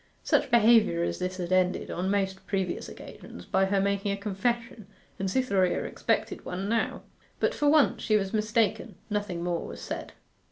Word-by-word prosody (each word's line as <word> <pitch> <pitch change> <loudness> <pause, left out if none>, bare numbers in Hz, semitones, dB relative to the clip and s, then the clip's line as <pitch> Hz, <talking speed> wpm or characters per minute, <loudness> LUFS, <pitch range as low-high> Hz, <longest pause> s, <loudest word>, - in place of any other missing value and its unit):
Such - - +2
behaviour 225 -7 +5
as - - -2
this 185 0 -3
had 180 -1 -4
ended, 185 0 +1
on 185 +2 -2
most 190 -1 -1
previous 190 -3 -2
occasions, 90 - -11
by 190 0 +2
her 195 +1 +1
making 200 +1 0
a 200 - -2
confession, 225 +2 -2 0.3
and 190 0 -1
Cytherea 195 -6 +1
expected - - -1
one 185 +2 -4
now. 230 +2 -1 0.4
But - - +1
for 290 - +2
once 300 -1 +4
she 215 -2 +3
was 195 0 -2
mistaken, 215 -1 0 0.2
nothing 205 -5 -2
more 175 -1 -1
was - - -8
said. - - -6
200 Hz, 170 wpm, -28 LUFS, 185-220 Hz, 0.4 s, behaviour